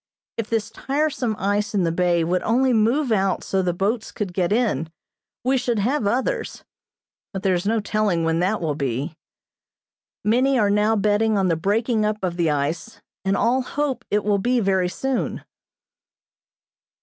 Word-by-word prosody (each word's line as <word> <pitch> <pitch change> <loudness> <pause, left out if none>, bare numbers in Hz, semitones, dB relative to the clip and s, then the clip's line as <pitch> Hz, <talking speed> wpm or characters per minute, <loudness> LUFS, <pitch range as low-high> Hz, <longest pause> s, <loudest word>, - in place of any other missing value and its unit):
If 230 -1 -4
this 225 -1 -1
tiresome 270 -4 -1
ice 205 +1 -1
in 195 - +2
the 165 - +1
bay 175 0 +2
would 180 +2 0
only 255 +3 +2
move 235 +5 +2
out 195 -3 +1
so 190 - 0
the 180 -1 0
boats 205 +6 -1
could 195 -4 -4
get 175 0 0
in, 205 - +1 0.5
we 260 +1 +2
should 240 -2 -1
have 225 +2 0
others, 265 - -1 0.7
but 190 -2 -5
there 190 - +3
is 180 +2 -1
no 225 +1 +2
telling 205 -5 0
when 165 0 +1
that 190 +4 0
will 160 -3 0
be. 140 +2 -3 1.1
Many 255 +5 +3
are 205 -4 +3
now 210 +2 +3
betting 210 +1 +2
on 190 -2 +2
the 165 - +2
breaking 215 +6 0
up 210 0 0
of 180 -2 -1
the 170 -2 +1
ice, 155 +9 -2 0.2
and 195 0 +1
all 250 +3 +2
hope 280 +1 -2
it 210 0 +1
will 205 -1 +1
be 245 +5 +1
very 190 -4 +1
soon. 265 +7 -2
210 Hz, 175 wpm, -22 LUFS, 180-230 Hz, 1.1 s, there